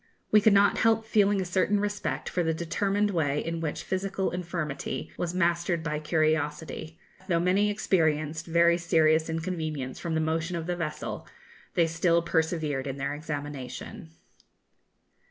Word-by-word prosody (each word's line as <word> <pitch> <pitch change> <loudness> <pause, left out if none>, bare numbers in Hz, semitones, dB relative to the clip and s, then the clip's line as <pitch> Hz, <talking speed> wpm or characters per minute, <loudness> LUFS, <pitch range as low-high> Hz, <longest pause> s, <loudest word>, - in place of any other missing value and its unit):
We 215 - +6
could 220 +1 +5
not 200 0 +4
help 225 0 +3
feeling 205 -2 +3
a - - -2
certain 190 +3 +1
respect 205 0 -2
for 180 - -1
the 160 -1 0
determined 200 +5 0
way 150 -5 +1
in 165 0 -2
which 155 -2 -3
physical 190 0 -2
infirmity 170 -5 -4
was 175 0 -3
mastered 170 -1 +1
by 150 -1 -2
curiosity 155 0 -1 0.2
for, 190 - -21
though 170 -3 +2
many 190 +4 +2
experienced 160 -6 0
very 170 +1 +4
serious 160 -2 +3
inconvenience 160 -5 -3
from 165 -2 -2
the - - +2
motion 160 +2 -1
of 165 -1 -3
the 175 +1 -1
vessel, 155 -3 -4 0.5
they 170 - +4
still 165 +1 +2
persevered 160 -4 0
in 135 0 -4
their 140 +1 -2
examination. 145 - -6
165 Hz, 155 wpm, -28 LUFS, 155-185 Hz, 0.5 s, We